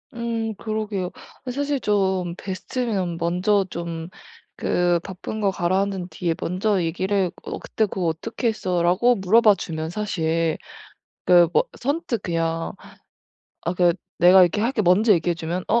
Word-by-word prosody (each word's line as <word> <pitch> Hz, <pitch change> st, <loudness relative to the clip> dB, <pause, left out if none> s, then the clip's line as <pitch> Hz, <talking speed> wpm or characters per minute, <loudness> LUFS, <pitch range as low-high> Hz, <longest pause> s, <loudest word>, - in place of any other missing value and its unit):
음 230 Hz, -2 st, -2 dB
그러게요. 210 Hz, -4 st, -3 dB, 0.3 s
어 250 Hz, -, -3 dB
사실 285 Hz, +2 st, -1 dB
좀 190 Hz, -5 st, 0 dB
베스트면 190 Hz, -2 st, -3 dB
먼저 180 Hz, +4 st, +1 dB
좀 170 Hz, -1 st, -5 dB, 0.5 s
그 175 Hz, -1 st, +2 dB
바쁜 195 Hz, +3 st, -6 dB
거 200 Hz, -2 st, +2 dB
가라앉은 190 Hz, 0 st, -1 dB
뒤에 170 Hz, -3 st, -2 dB
먼저 190 Hz, +1 st, 0 dB
얘기를 185 Hz, +2 st, 0 dB
"어 -, -, -5 dB
그때 220 Hz, -, -1 dB
그거 185 Hz, -3 st, -2 dB
어떻게 225 Hz, +9 st, -2 dB
했어?"라고 185 Hz, +4 st, +2 dB
물어봐 210 Hz, +1 st, +5 dB
주면 160 Hz, -3 st, -4 dB
사실 165 Hz, -4 st, -1 dB, 0.7 s
그 175 Hz, -1 st, +7 dB
뭐 -, -, +4 dB, 0.2 s
선뜻 280 Hz, -, -2 dB
그냥 165 Hz, -1 st, -1 dB, 0.9 s
아 170 Hz, -, 0 dB
그 175 Hz, -1 st, +3 dB, 0.2 s
"내가 180 Hz, +2 st, +7 dB
이렇게 180 Hz, +3 st, +2 dB
할게." 230 Hz, 0 st, +1 dB
먼저 205 Hz, +4 st, +5 dB
얘기해 175 Hz, 0 st, +1 dB
주면 170 Hz, +2 st, -4 dB
어 235 Hz, -, +3 dB
185 Hz, 275 characters per minute, -23 LUFS, 175-215 Hz, 0.9 s, 그